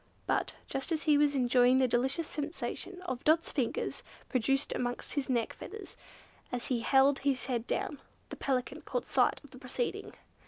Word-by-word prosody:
But, - - 0
just 270 +5 -4
as 315 -1 0
he 300 -2 +5
was 290 0 +3
enjoying 250 0 +5
the 260 -1 +4
delicious 265 +7 +1
sensation 350 +4 -4 0.2
Dot's 320 +2 +3
fingers 255 -6 -1 0.3
produced 270 +2 +1
amongst 245 0 -2
his 285 -2 -2
neck 235 -3 +1
feathers, 420 -1 -9 0.6
as 245 -2 -3
he 250 -3 +1
held 270 +3 +4
his 270 -4 0
head 245 -2 -2
down, 290 - -2 0.3
the - - -6
Pelican 255 -2 -1
caught - - -3
sight - - +2
of 285 - -15
the 255 - -12
proceeding. 270 - -3
270 Hz, 165 wpm, -31 LUFS, 250-295 Hz, 0.6 s, he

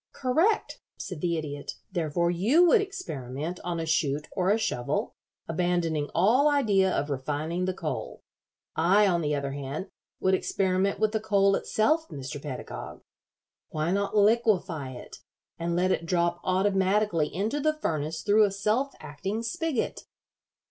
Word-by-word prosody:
"Correct," 325 - +1 0.2
said 180 -6 -6
the 170 -2 0
Idiot. 145 -2 -5 0.2
"Therefore, 170 -1 0
you 230 - +4
would 415 +5 +5
experiment 170 - -5
on 175 -1 -2
a 165 - -2
chute 150 -2 0
or 185 -1 0
a 210 - +4
shovel, 125 - -1 0.3
abandoning 165 -3 0
all 235 - +4
idea 205 -10 +3
of 145 -3 -1
refining 150 +6 -2
the 185 - -1
coal. 135 -11 -5 0.5
I, 190 +6 +4
on 175 -3 +2
the 150 -1 0
other 140 -1 -2
hand, 140 +6 -5 0.3
would 190 - +2
experiment 190 +1 +1
with 215 -1 +2
the 220 - 0
coal 200 -2 +3
itself, 310 +11 +1
Mr. 135 0 -6
Pedagog. 135 -4 -7 0.7
Why 155 +2 -1
not 200 +2 0
liquefy 200 - +2
it, 125 - -10 0.4
and 170 0 -1
let 185 +2 +2
it 165 - -1
drop 170 0 +1
automatically 190 -3 +2
into 215 - -1
the 310 +1 +2
furnace 160 - -2
through 210 +1 +5
a 200 - -1
self 215 +8 0
acting 175 +10 -4
spigot?" 270 +3 -2
180 Hz, 150 wpm, -27 LUFS, 155-210 Hz, 0.7 s, would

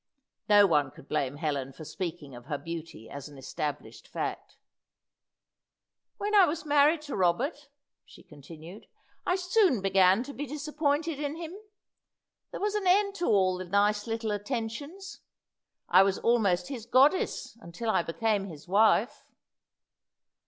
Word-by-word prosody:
No 205 -1 +7
one 150 -7 +2
could 130 - -16
blame 140 -3 -1
Helen 145 -3 -3
for 155 - -10
speaking 165 -6 -6
of 120 0 -11
her 145 - -2
beauty 165 -5 -8
as 140 +1 -8
an 145 - -14
established 145 +2 -6
fact. - - -5 1.6
"When 415 +1 -3
I 400 -3 +7
was 320 +1 -3
married 295 +2 +3
to 290 - -5
Robert," 265 - 0 0.3
she - - -17
continued, 160 +6 -13 0.4
"I 360 - +3
soon 370 - +2
began 190 +2 +4
to 280 +2 -9
be 290 +1 -5
disappointed 300 +1 -1
in 295 0 -3
him. 330 0 -7 1.0
There - - -7
was 415 +1 -1
an 415 -3 -1
end 400 +2 +3
to 350 - -1
all 185 -3 +2
the 185 - -5
nice 205 +3 +1
little 225 -1 -2
attentions. 255 - -5 0.7
I 180 +2 +6
was 195 0 +2
almost 225 -1 +1
his 240 -5 -7
goddess 270 +6 +2
until 220 +6 -3
I - - +2
became 205 +4 -1
his 160 -2 -11
wife." 210 +4 +3
210 Hz, 145 wpm, -28 LUFS, -, 1.6 s, No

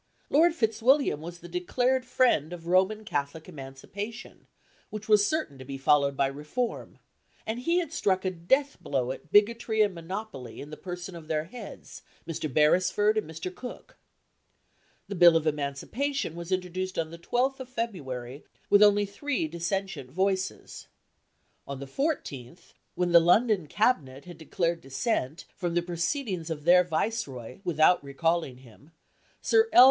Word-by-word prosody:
Lord 325 +3 +5
Fitzwilliam 225 - +2
was 170 +1 -8
the 175 - -9
declared 245 +9 0
friend 235 - +2
of 170 -2 -9
Roman 190 +5 +2
Catholic 145 0 -3
Emancipation, 180 - -8 0.4
which 215 0 -7
was 210 -2 +5
certain 160 - -2
to - - -8
be 135 +1 -6
followed 140 0 +3
by 140 - +3
reform; 150 - -4 0.5
and 220 +2 -3
he 335 +8 +1
had 335 -3 -1
struck 190 - +1
a 185 - +1
death 265 +12 +1
blow 130 -3 -1
at 140 +3 -9
bigotry 220 +1 +4
and 205 -2 0
monopoly 170 - -7
in 145 - -9
the - - -6
person 180 +1 -7
of 165 -2 -10
their 155 -1 0
heads, 210 +5 -10 0.3
Mr. 155 -3 -3
Beresford 185 - +3
and 215 -7 -2
Mr. 160 +3 -6
Cooke. 245 +6 -9 1.1
The 200 - -5
Bill 175 -3 +7
of 160 - -2
Emancipation 155 - -2
was 170 +1 -7
introduced 185 0 -2
on 160 -1 -1
the 170 - -9
12th 255 +9 0
of 260 -1 -8
February, 140 - -5 0.3
with 205 - +7
only 205 0 +6
three 200 - -2
dissentient 170 -3 -3
voices. 190 +5 -2 0.8
On 140 -1 -5
the 140 - -6
14th, 145 - -4 0.2
when 180 -1 0
the 170 - +9
London 180 +1 +3
Cabinet 145 - 0
had 175 -2 -11
declared 170 +1 -1
dissent 140 - -2
from 175 -2 -3
the 175 - +2
proceedings 175 - -2
of 155 -2 -4
their 180 +2 +6
Viceroy 160 - -3
without 170 0 +3
recalling 150 -1 -1
him, 130 +3 -18 0.5
Sir 450 0 +4
L. - - +6
175 Hz, 155 wpm, -28 LUFS, 150-215 Hz, 1.1 s, the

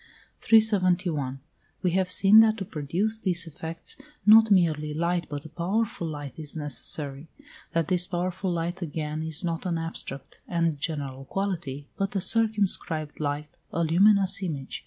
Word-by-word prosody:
371. 180 - +3 0.4
We 180 - +2
have 185 +1 +1
seen 195 +4 +7
that 220 0 +5
to 195 - -4
produce 175 +9 -2
these 180 -4 +2
effects 165 +1 -7 0.3
not 220 +1 +8
merely 155 -6 +2
light 170 +2 -1
but 145 0 -6
a - - -9
powerful 180 +2 -2
light 145 -4 -6
is 155 0 -6
necessary; 145 0 -4 0.4
that 165 -1 +1
this 180 -1 +1
powerful 185 +1 -2
light 175 +2 -3
again 155 -1 -4
is 160 +1 -2
not 170 -1 -2
an 170 -2 -1
abstract 160 -4 -6
and 165 -4 0
general 140 -3 -4
quality, 165 -7 -4
but 195 +1 -2
a - - +2
circumscribed 200 -8 0
light, 145 0 -4
a 170 - 0
luminous 195 +3 +4
image. 145 -8 -4
170 Hz, 150 wpm, -26 LUFS, 150-190 Hz, 0.4 s, not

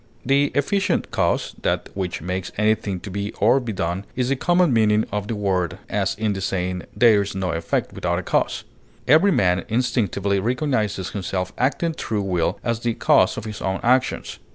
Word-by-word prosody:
The 140 +2 +3
efficient 195 +8 0
cause, - - 0
that - - -1
which 90 -5 -4
makes 90 +1 -3
anything 105 -3 +1
to 100 - -8
be 100 +2 -3
or 120 +6 +3
be 120 -3 -4
done, 95 -1 -2
is 125 0 0
the 135 - +2
common 175 +1 +2
meaning 110 -1 +3
of 105 0 -3
the 115 - -2
word, 95 -3 -1
as 100 +1 0
in 110 -1 -1
the 95 - -5
saying 90 -1 -2
"There 115 -4 +5
is 100 -1 -4
no 95 -2 -1
effect 85 0 -2
without 85 -1 -1
a 95 - -3
cause." - - 0 0.4
Every 160 +9 +6
man 90 - +2
instinctively 100 -4 0
recognizes 110 - -1
himself 95 -2 -3
acting 145 +6 0
through 105 -9 -2
will 90 -4 0
as 115 -2 -1
the 115 -1 -1
cause - - +3
of - - -5
his 105 -1 -6
own 95 0 -1
actions. 130 +2 +1
105 Hz, 185 wpm, -22 LUFS, 95-120 Hz, 0.4 s, Every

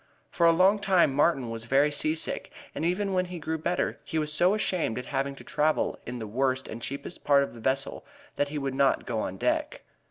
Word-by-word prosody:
For 170 - +3
a - - +7
long 190 +5 +4
time 185 -7 +3
Martin 135 -4 +2
was 115 0 -6
very 140 +5 +3
seasick, 155 +2 -2 0.2
and - - -4
even 190 +4 0
when 185 0 +1
he 180 0 -7
grew 160 0 -3
better 175 +3 -1
he 160 - -4
was 150 -1 +1
so 180 +6 +4
ashamed 185 - -1
at 125 - -4
having 140 0 -2
to - - -12
travel 155 +1 0
in 125 +1 -4
the 115 - -5
worst 130 +4 -1
and 115 - -7
cheapest 140 +7 -6
part 140 -1 +5
of - - -6
the 120 - -11
vessel 135 +4 -2 0.3
that 145 - +1
he 150 +1 -5
would 135 -2 -2
not 135 0 +2
go 115 -3 -2
on 95 -3 -3
deck. - - -1
145 Hz, 225 wpm, -27 LUFS, 130-170 Hz, 0.3 s, a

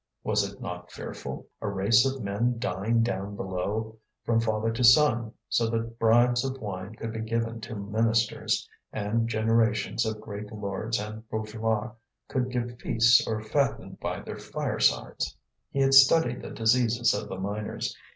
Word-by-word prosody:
Was 105 -2 +1
it 100 - -16
not 90 0 -7
fearful? - - -7 0.2
a - - -3
race 105 +6 +4
of 135 -2 -3
men 115 +5 0
dying 115 +1 0
down 100 -3 -3
below, 105 +4 -3 0.2
from 115 -1 +2
father 110 0 0
to 115 +2 -2
son, 120 -3 +5 0.2
so 115 -1 +1
that 115 0 -3
bribes 120 +2 +4
of 135 0 -3
wine 100 -1 -6
could 115 0 -5
be 110 - -4
given 115 0 -2
to 110 +1 -6
ministers, 110 +2 0 0.2
and 110 +2 -1
generations 110 0 +1
of 110 -1 -3
great 105 -1 -7
lords 105 +1 -3
and 110 +1 -7
bourgeois 110 +1 -2 0.4
could 130 -1 -1
give 120 -1 -3
feasts 120 +5 +4
or 110 -1 -2
fatten 140 +6 -1
by - - -3
their - - -7
firesides! - - -1 0.3
He 140 - -1
had 135 0 +3
studied 135 0 +6
the - - -7
diseases 120 +1 +2
of - - -4
the - - -5
miners. 100 +3 -3
110 Hz, 160 wpm, -27 LUFS, 105-120 Hz, 0.4 s, studied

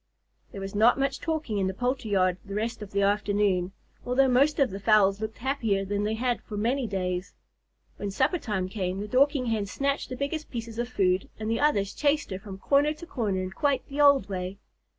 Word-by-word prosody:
There 195 - -7
was 195 0 -5
not 220 +5 +5
much 275 0 0
talking 310 -10 -2
in 190 - +1
the 190 - -3
poultry 245 0 -2
yard 185 -3 +2
the 200 -1 -7
rest 220 +1 -2
of 210 - -7
the 200 0 0
afternoon, 205 -2 +1 0.3
although 260 +2 +3
most 275 +4 +3
of 275 -7 +2
the 195 - -5
fowls 200 -1 +4
looked 220 0 -4
happier 225 -7 0
than 205 +1 -1
they 215 +1 0
had 245 +1 -1
for 210 - -7
many 240 +4 0
days. 180 -2 -3 0.6
When 205 - -3
supper 345 - +1
time 200 -8 -2
came, 185 -1 -3
the 205 - -4
Dorking 270 +3 +3
Hen 220 -3 -1
snatched 275 +7 -1
the 255 - -4
biggest 300 +3 -3
pieces 230 -1 -6
of 240 0 -2
food, 190 -5 +1
and 220 +1 -3
the 230 - 0
others 205 -10 +2
chased 295 -3 +1
her 190 - -3
from 195 -1 -9
corner 285 +8 +2
to 340 - -10
corner 210 - -2
in 185 - -5
quite 280 +5 0
the 285 +1 -1
old 280 -8 +6
way. 185 0 -4
215 Hz, 215 wpm, -27 LUFS, 195-270 Hz, 0.6 s, old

